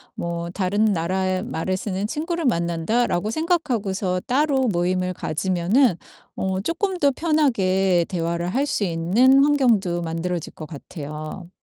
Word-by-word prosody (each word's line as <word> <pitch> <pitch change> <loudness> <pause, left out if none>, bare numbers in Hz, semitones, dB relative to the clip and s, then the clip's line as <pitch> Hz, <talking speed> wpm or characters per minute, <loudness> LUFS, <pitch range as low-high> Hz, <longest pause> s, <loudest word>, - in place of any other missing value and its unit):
뭐 170 0 -4
다른 200 +3 +1
나라의 185 +2 -1
말을 185 +4 -2
쓰는 195 +1 -3
친구를 330 +4 -3
만난다.'라고 175 +1 0
생각하고서 225 - -1
따로 270 0 +2
모임을 185 -1 0
가지면은 185 - +1 0.4
어 190 0 -1
쪼끔 365 - -1
더 285 -3 +4
편하게 195 - +2
대화를 170 -1 -2
할 275 +3 +1
수 265 -7 -1
있는 200 +11 +4
환경도 230 -12 +2
만들어질 165 +1 -3
것 155 - -8
같아요. 155 +3 -8
190 Hz, 295 characters per minute, -23 LUFS, 170-260 Hz, 0.4 s, 더